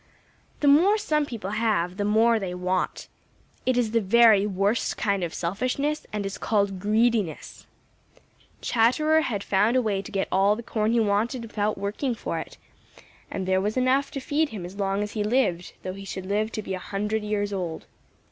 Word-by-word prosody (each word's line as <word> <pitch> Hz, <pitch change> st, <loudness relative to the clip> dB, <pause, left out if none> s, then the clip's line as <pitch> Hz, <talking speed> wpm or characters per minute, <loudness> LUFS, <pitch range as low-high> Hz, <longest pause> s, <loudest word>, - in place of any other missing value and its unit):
The 290 Hz, -, +2 dB
more 350 Hz, +9 st, +6 dB
some 305 Hz, -8 st, 0 dB
people 205 Hz, -6 st, -5 dB
have, 210 Hz, -5 st, 0 dB
the 205 Hz, -, -1 dB
more 225 Hz, +2 st, +4 dB
they 185 Hz, -3 st, -4 dB
want. 180 Hz, +1 st, -2 dB, 0.6 s
It 255 Hz, -1 st, +2 dB
is 235 Hz, -3 st, +1 dB
the 230 Hz, 0 st, +2 dB
very 215 Hz, 0 st, +5 dB
worst 200 Hz, +3 st, 0 dB
kind 200 Hz, -3 st, 0 dB
of 170 Hz, -, -2 dB
selfishness 255 Hz, -, -2 dB
and 210 Hz, -1 st, -3 dB
is 195 Hz, -, -5 dB
called 200 Hz, -3 st, 0 dB
greediness. 215 Hz, -3 st, 0 dB, 0.9 s
Chatterer 305 Hz, +7 st, +3 dB
had 210 Hz, -9 st, -2 dB
found 205 Hz, +5 st, +2 dB
a 255 Hz, -, +4 dB
way 200 Hz, -3 st, 0 dB
to 195 Hz, -, -10 dB
get 195 Hz, -1 st, -1 dB
all 195 Hz, +2 st, +3 dB
the 235 Hz, -, -7 dB
corn 220 Hz, -1 st, 0 dB
he 235 Hz, -, +3 dB
wanted 225 Hz, +4 st, 0 dB
without 215 Hz, -2 st, -2 dB
working 210 Hz, +6 st, -2 dB
for -, -, -4 dB
it, -, -, -9 dB, 0.7 s
and 190 Hz, -1 st, -4 dB
there 190 Hz, 0 st, +2 dB
was 210 Hz, +4 st, -2 dB
enough 260 Hz, +2 st, +2 dB
to 275 Hz, -, -3 dB
feed 295 Hz, +3 st, 0 dB
him 200 Hz, -5 st, -6 dB
as 180 Hz, +2 st, -9 dB
long 195 Hz, 0 st, 0 dB
as 210 Hz, -, -5 dB
he 210 Hz, -, -2 dB
lived, 205 Hz, -6 st, 0 dB
though 185 Hz, -, -4 dB
he 195 Hz, +1 st, -9 dB
should 190 Hz, -1 st, -6 dB
live 210 Hz, +3 st, -1 dB
to 215 Hz, -, -4 dB
be 190 Hz, -, -4 dB
a 185 Hz, -, -3 dB
hundred 210 Hz, +3 st, -2 dB
years 205 Hz, -1 st, -2 dB
old. 175 Hz, -4 st, -4 dB
210 Hz, 195 wpm, -25 LUFS, 195-235 Hz, 0.9 s, more